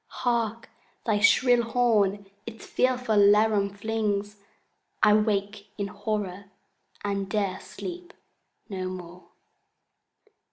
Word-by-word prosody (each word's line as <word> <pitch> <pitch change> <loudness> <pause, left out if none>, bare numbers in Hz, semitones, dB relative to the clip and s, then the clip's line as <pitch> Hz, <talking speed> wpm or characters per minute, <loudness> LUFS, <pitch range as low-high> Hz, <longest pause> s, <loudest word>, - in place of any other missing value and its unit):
Hark, 230 -2 -2 0.4
thy 215 -3 +2
shrill 245 +3 +5
horn 220 -4 +1 0.2
its 225 -1 -9
fearful 250 -4 +1
laram 205 0 +4
flings! 210 -1 -2 0.7
—I 210 - +7
wake 205 -1 0
in 200 -1 -3
horror, 200 -1 -4 0.6
and 200 -1 -2
'dare 200 -3 -1
sleep 355 0 -8 0.6
no 190 -3 -4
more! 180 -1 -9
210 Hz, 95 wpm, -26 LUFS, 200-225 Hz, 0.7 s, I